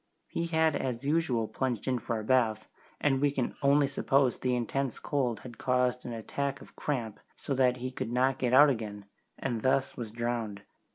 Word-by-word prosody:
He 170 - -2
had 160 -2 +2
as 125 -2 -2
usual 140 -7 +1
plunged 125 -3 -2
in 130 -1 +1
for 115 -1 -2
a - - -5
bath, 110 -3 +2 0.3
and 135 -2 +2
we 145 - +4
can 135 -3 -2
only 140 0 +4
suppose 135 -1 +2
the 125 -1 +1
intense 125 +1 -1
cold 125 -7 -1
had 120 -2 -11
caused 125 -1 +1
an - - -4
attack 135 +5 -3
of - - -15
cramp, 115 -8 -3 0.2
so 140 - -3
that 130 -1 +3
he 130 +1 -4
could 120 - -4
not 130 +2 +2
get 125 -2 +1
out 140 +3 +8
again, 105 -4 -5 0.3
and 120 -4 -2
thus 130 +2 +1
was 115 -3 -5
drowned. 115 -3 -3
125 Hz, 190 wpm, -30 LUFS, 115-140 Hz, 0.3 s, out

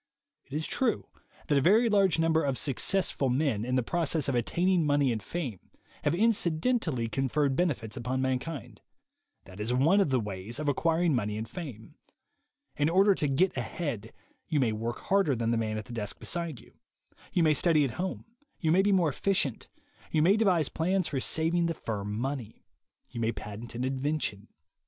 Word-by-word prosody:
It 135 - -13
is 155 +1 -1
true 250 -4 0 0.4
that 145 -2 +3
a - - 0
very 215 - +5
large 195 -6 +3
number 165 0 +2
of 135 -2 0
Successful 145 0 0
Men, 125 -5 +1
in 125 +2 -1
the 130 - +2
process 160 +1 0
of 135 - 0
attaining 175 +9 +1
money 145 -3 +2
and 110 -2 -2
fame, 130 - -4 0.4
have - - +2
inci 185 -4 +2
dentally 160 - 0
conferred 135 +2 +1
benefits 130 -11 -1
upon 125 +2 -2
mankind. 130 +3 -3 0.6
That 95 +1 -13
is 115 +4 -1
one 165 +10 +4
of 190 - +1
the 130 -1 +2
ways 105 +1 -5
of 150 0 -3
acquiring 165 +3 +2
money 105 -4 -1
and 110 +1 -4
fame. 145 - -9 0.8
In 145 +1 +2
order 195 +4 +5
to 150 - -1
"get 165 +8 +2
ahead," 120 - -4 0.4
you 155 -3 +1
may 125 -5 +2
work 115 +2 -4
harder 195 -8 +2
than 115 0 0
the - - +2
man 110 -1 -1
at 110 - -5
the 120 - -9
desk 105 -3 -3
beside 170 -7 -2
you; - - -20 0.5
you 175 - +2
may 155 -1 +5
study 155 0 +3
at 130 - -2
home, 185 - -4 0.3
you 160 -3 +1
may 185 +3 +5
be 205 +1 +2
more 180 -5 +3
efficient, 150 - -1 0.4
you 155 - +2
may 190 +5 +5
devise 185 -9 +3
plans 180 +2 0
for 140 - -1
saving 165 +5 +1
the 165 - -2
firm 105 -5 -4
money; 130 -3 -4 0.5
you 115 - -6
may 115 0 +1
patent 110 +2 -8
an 120 - -2
invention. 130 -6 -2
145 Hz, 190 wpm, -29 LUFS, 120-170 Hz, 0.8 s, very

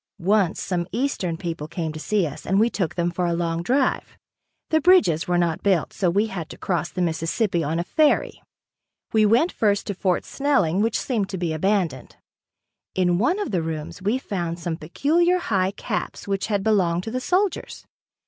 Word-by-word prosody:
Once 195 0 +2
some 175 -2 -2
eastern 210 -8 -1
people 165 -3 -5
came 160 -1 -4
to 155 - -7
see 200 +3 +1
us 145 -2 -7
and 195 +2 +1
we 230 +2 +3
took 170 -4 -2
them 175 0 0
for 175 +1 -1
a 170 - 0
long 170 -1 -1
drive. 260 +8 0 0.5
The 315 0 +3
bridges 320 - +4
were 175 0 +2
not 170 +1 0
built, 190 -6 +1
so 185 -4 +1
we 200 +5 +2
had 185 -6 -6
to - - -9
cross 175 -2 -1
the 180 - -2
Mississippi 170 +3 0
on 155 +3 -1
a 170 - 0
ferry. 300 - +1 0.7
We 215 -1 +5
went 245 - +3
first 205 -2 +1
to 205 - -3
Fort 185 -1 0
Snelling 200 - +1
which 225 +1 +1
seemed 215 -7 -1
to 190 - -4
be 170 -3 -1
abandoned. 170 -6 -1 0.8
In 180 -1 +2
one 250 - +2
of 415 - -3
the 180 -4 +1
rooms 160 +3 -5
we 210 +6 +1
found 175 -9 -3
some 170 -1 -3
peculiar 320 - +1
high 190 - 0
caps 200 - -4
which 195 -1 -1
had 205 -3 0
belonged 180 -5 +2
to 225 - -5
the 255 +2 -2
soldiers. 370 +7 -1
190 Hz, 195 wpm, -23 LUFS, 170-220 Hz, 0.8 s, We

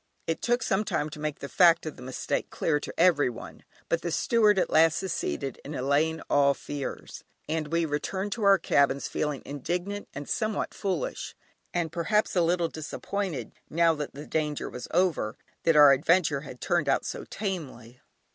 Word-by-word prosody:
It 165 - -2
took 240 0 +1
some 195 0 +1
time 150 -7 -2
to 150 - -9
make 150 -1 -4
the 140 - -4
fact 170 +1 +5
of 155 - -5
the - - -13
mistake 130 +1 -3
clear 150 -2 0
to - - -8
everyone, 150 -9 +1 0.2
but 170 - 0
the 175 - -2
steward 210 +2 +3
at 185 - +1
last 160 +1 +5
succeeded 150 - -3
in 145 +2 -6
allaying 145 +5 +1
all 140 -1 +4
fears, 145 0 -6 0.2
and 155 -1 -1
we 165 +2 +1
returned 190 +7 -3
to 220 +1 -3
our 200 -1 +7
cabins, 140 -5 +2
feeling 150 -3 -2
indignant 180 +8 -4
and 145 - -6
somewhat 215 -2 -1
foolish, 190 -5 -3 0.4
and 170 -3 -1
perhaps 205 +6 0
a 180 - +4
little 170 0 +2
disappointed 160 - -4 0.2
(now 165 +1 +3
that 150 -3 -5
the 145 +2 -8
danger 150 -2 -2
was 125 - -7
over) 170 -12 +1 0.3
that 165 - +4
our 145 -2 +9
adventure 155 0 +2
had 135 -4 -10
turned 165 -5 0
out - - +2
so - - -4
tamely. 135 - -6
160 Hz, 175 wpm, -27 LUFS, 145-180 Hz, 0.4 s, our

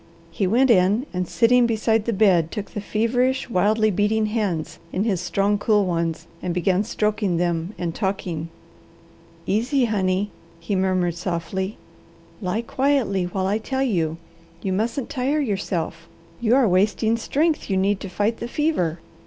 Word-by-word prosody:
He 190 +3 0
went 245 +6 +4
in 205 +5 +3
and 180 -1 -2
sitting 245 +3 +4
beside 220 -1 +1
the 235 - 0
bed 190 -6 +3
took 205 0 -6
the 210 - -4
feverish, 245 +5 0
wildly 215 +3 +3
beating 210 +3 +1
hands 210 -7 -2
in 190 - 0
his 195 -6 0
strong, 200 +3 +1
cool 210 -2 +3
ones, 165 -2 -2 0.2
and 175 -1 -2
began 185 +2 +2
stroking 210 -4 0
them 175 +2 -1
and 170 -2 -3
talking. 180 -5 -3 1.0
"Easy, 245 +6 +1
honey," 195 -2 0 0.3
he 170 +4 -2
murmured 185 -2 +1
softly. 180 +3 -3 0.6
"Lie 205 +4 -1
quietly 255 -8 +1
while 185 +1 -2
I 205 +3 +1
tell 265 +4 -2
you. 165 -10 0 0.5
You 190 - -1
mustn't 230 +6 -1
tire 275 +2 0
yourself. 190 - -2 0.3
You 240 +1 +3
are 265 -3 +4
wasting 210 +4 +2
strength 300 +7 0
you 190 - +1
need 195 +1 +1
to 195 - -6
fight 210 +4 0
the 235 - -5
fever. 240 - 0
205 Hz, 155 wpm, -23 LUFS, 180-230 Hz, 1.0 s, went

